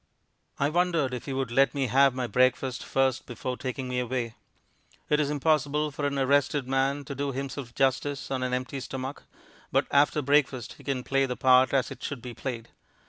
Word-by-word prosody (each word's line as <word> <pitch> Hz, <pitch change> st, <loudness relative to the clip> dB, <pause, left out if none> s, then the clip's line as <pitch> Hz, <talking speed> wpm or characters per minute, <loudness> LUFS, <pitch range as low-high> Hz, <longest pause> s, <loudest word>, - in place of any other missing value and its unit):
I 140 Hz, -, +1 dB
wondered 165 Hz, -5 st, +1 dB
if 125 Hz, -, -6 dB
he 135 Hz, -, -2 dB
would 130 Hz, -2 st, -2 dB
let 135 Hz, +4 st, +3 dB
me 135 Hz, -2 st, +1 dB
have 135 Hz, +2 st, +4 dB
my 130 Hz, -1 st, -1 dB
breakfast 130 Hz, +1 st, +1 dB
first 130 Hz, -1 st, 0 dB
before 125 Hz, +1 st, -4 dB
taking 130 Hz, 0 st, -4 dB
me 125 Hz, 0 st, -1 dB
away. 120 Hz, -2 st, -2 dB, 0.8 s
It 150 Hz, -, +4 dB
is 145 Hz, -2 st, +1 dB
impossible 150 Hz, 0 st, +1 dB
for 145 Hz, +1 st, -2 dB
an 140 Hz, 0 st, -2 dB
arrested 140 Hz, 0 st, +2 dB
man 135 Hz, +2 st, 0 dB
to 140 Hz, -, -5 dB
do 140 Hz, +1 st, -2 dB
himself 135 Hz, -2 st, -5 dB
justice 135 Hz, +1 st, 0 dB
on 130 Hz, -1 st, -1 dB
an 130 Hz, 0 st, -1 dB
empty 125 Hz, +2 st, -2 dB
stomach, 130 Hz, +1 st, -5 dB, 0.5 s
but -, -, +2 dB
after 145 Hz, +1 st, +3 dB
breakfast 135 Hz, -3 st, +1 dB
he -, -, -13 dB
can 135 Hz, -3 st, -2 dB
play 135 Hz, +1 st, +1 dB
the 125 Hz, -, -4 dB
part 130 Hz, 0 st, +5 dB
as 135 Hz, 0 st, +1 dB
it 130 Hz, -, -9 dB
should 140 Hz, -, -4 dB
be 125 Hz, -, -6 dB
played. 115 Hz, -2 st, -5 dB
135 Hz, 195 wpm, -27 LUFS, 125-140 Hz, 0.8 s, part